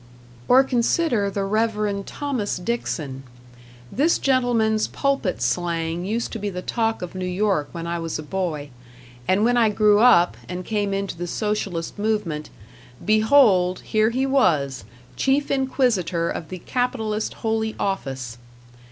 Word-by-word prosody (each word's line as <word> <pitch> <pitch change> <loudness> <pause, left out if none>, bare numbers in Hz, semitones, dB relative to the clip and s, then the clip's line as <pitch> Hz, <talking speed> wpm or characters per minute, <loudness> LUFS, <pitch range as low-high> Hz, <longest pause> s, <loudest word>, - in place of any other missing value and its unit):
Or 260 +2 +6
consider 245 -3 +1
the 200 0 -2
Reverend 210 -1 -1
Thomas 265 -8 -2
Dixon. 165 - -3 0.7
This 310 +6 +2
gentleman's 235 -5 +2
pulpit 275 - -1
slang 165 +5 -1
used 225 +4 -2
to 225 - -5
be 205 0 -2
the 180 -1 -6
talk 225 -4 -1
of 180 - -6
New 185 0 -4
York 180 -5 0
when 170 -1 -6
I 170 0 -2
was 165 -1 -3
a 155 - -6
boy; 155 -4 -3 0.6
and 200 +4 +3
when 245 +1 +3
I 230 -2 +4
grew 210 0 +4
up, 195 -7 +5
and 180 0 -5
came 205 -2 -1
into 195 -1 -2
the 175 +1 -5
Socialist 200 -3 -3
movement 205 -8 -1 0.6
behold, 215 -4 +4
here 215 0 +1
he 260 +3 0
was, 155 - +1 0.3
chief 275 +2 +1
inquisitor 245 - +1
of 160 - -6
the 185 - -6
capitalist 220 0 -2
Holy 220 0 0
Office. 135 -11 -3
205 Hz, 145 wpm, -23 LUFS, 175-230 Hz, 0.7 s, Or